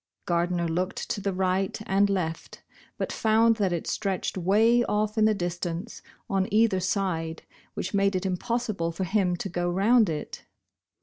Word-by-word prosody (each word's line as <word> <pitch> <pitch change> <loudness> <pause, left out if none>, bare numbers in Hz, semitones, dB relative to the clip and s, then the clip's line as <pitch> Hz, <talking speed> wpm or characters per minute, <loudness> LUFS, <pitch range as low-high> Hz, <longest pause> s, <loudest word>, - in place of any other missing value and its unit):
Gardner 175 0 0
looked 180 +3 -2
to 205 - -2
the 200 0 -1
right 190 +1 0
and 200 +1 +2
left, 170 -5 -3 0.3
but - - -3
found 225 +1 +3
that 195 -4 +1
it 170 -2 -2
stretched 195 -3 -2
way 215 +6 +3
off 210 0 0
in 215 -1 +3
the 215 0 +3
distance, 175 +3 -4 0.3
on 195 -3 0
either 215 -2 +3
side, 180 -4 -2 0.3
which 190 - -4
made 200 -1 +2
it 185 +1 -2
impossible 195 -2 -1
for 170 +3 -4
him 185 -1 +1
to 175 - -4
go 175 -1 -2
round 210 +4 +4
it. 150 -2 -5
190 Hz, 165 wpm, -26 LUFS, 175-210 Hz, 0.3 s, round